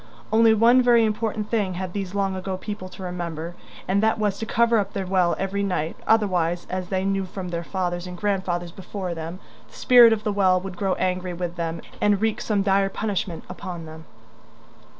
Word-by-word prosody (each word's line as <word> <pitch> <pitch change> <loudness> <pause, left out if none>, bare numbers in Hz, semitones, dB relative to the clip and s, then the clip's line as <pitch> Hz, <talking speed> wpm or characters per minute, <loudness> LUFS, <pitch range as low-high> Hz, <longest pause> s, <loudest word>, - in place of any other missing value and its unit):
Only 225 0 +6
one 235 +4 +6
very 240 -2 +5
important 215 -1 -2
thing 205 -5 0
had 185 0 -4
these 195 -1 -4
long 195 -1 0
ago 185 0 -4
people 205 -1 -6
to 185 - -10
remember, 170 -2 -4 0.3
and 195 +2 +2
that 220 0 +2
was 205 -2 -1
to 225 - -4
cover 235 0 +3
up 200 -1 -3
their 195 -1 -2
well 180 -2 +2
every 195 +1 -2
night, 180 -5 -1
otherwise, 180 -6 +2
as 185 -1 -3
they 190 -1 -1
knew 195 0 0
from 185 -1 -6
their 170 -1 -3
fathers 175 -1 -3
and 180 0 -7
grandfathers 180 -3 -1
before 190 0 -5
them, 165 +2 -6 0.3
the - - -19
spirit 245 -3 +7
of 220 -1 0
the 210 - -1
well 185 -2 +3
would 190 0 -7
grow 190 0 0
angry 185 -1 -1
with 175 0 -4
them 165 -1 -3 0.2
and 205 -1 +3
wreak 220 0 0
some 205 -3 0
dire 195 0 +2
punishment 195 -4 -3
upon 175 -4 -7
them. 160 0 -11
190 Hz, 200 wpm, -24 LUFS, 180-210 Hz, 0.3 s, spirit